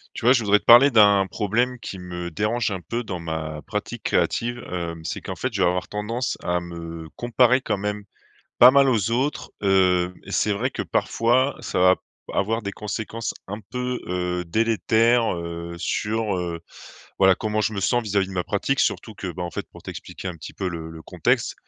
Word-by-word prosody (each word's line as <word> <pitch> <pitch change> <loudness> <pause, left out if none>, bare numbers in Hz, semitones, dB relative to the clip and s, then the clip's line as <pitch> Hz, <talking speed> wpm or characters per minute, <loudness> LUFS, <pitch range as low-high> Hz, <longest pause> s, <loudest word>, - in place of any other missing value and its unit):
Tu - - -5
vois? 125 - +7
Je 120 -4 +2
voudrais 105 0 +4
te - - -28
parler 120 +4 +9
d'un 100 -4 +5
problème 120 +6 0
qui 95 -3 -7
me 90 -1 -6
dérange 105 +5 0
un 95 -2 -4
peu 115 +8 -3
dans 90 -5 -5
ma 80 -2 -4
pratique - - -5
créative. 120 +1 0
Hem, 85 -2 -4
c'est - - -4
qu'en - - -6
fait 130 -2 -3
je 100 - -1
vais 90 - +5
avoir 90 +1 -1
tendance 115 +4 -2
à 90 0 +1
me 85 -1 -8
comparer 125 +1 +3
quand 105 - -1
même 105 +1 -3 0.6
pas 125 - +10
mal 140 0 +5
aux 115 -4 +1
autres. 130 +5 -1
Heu, 90 -2 +3
et - - -10
c'est 105 - +2
vrai 115 +7 -1
que - - -4
parfois, 130 +4 +1
ça - - -3
va 90 0 +6
p - - -36 0.3
avoir 115 +4 0
des 100 -1 -4
conséquences 110 +2 -4
un 105 +2 -5
peu, 125 +2 -4
heu, 90 0 -2
délétères, 115 +3 +2
heu, 85 0 -6
sur, 105 +4 -1
heu, 85 -1 -3 0.6
voilà 95 -1 +6
comment 110 +2 -2
je 110 - 0
me 100 - -2
sens 120 +6 +2
vis-à-vis 100 -3 0
de - - -8
ma 90 -2 -1
pratique. 135 +7 0
Surtout 110 - -1
que, 100 - -7
bah, 90 - -6
en 85 - -4
fait - - -5
pour - - -13
t'expliquer 95 - -7
un 90 - -6
petit 80 - -10
peu 95 - -2
le 80 -2 -6
le 80 0 -10
contexte, - - 0
100 Hz, 210 wpm, -23 LUFS, 90-115 Hz, 0.6 s, pas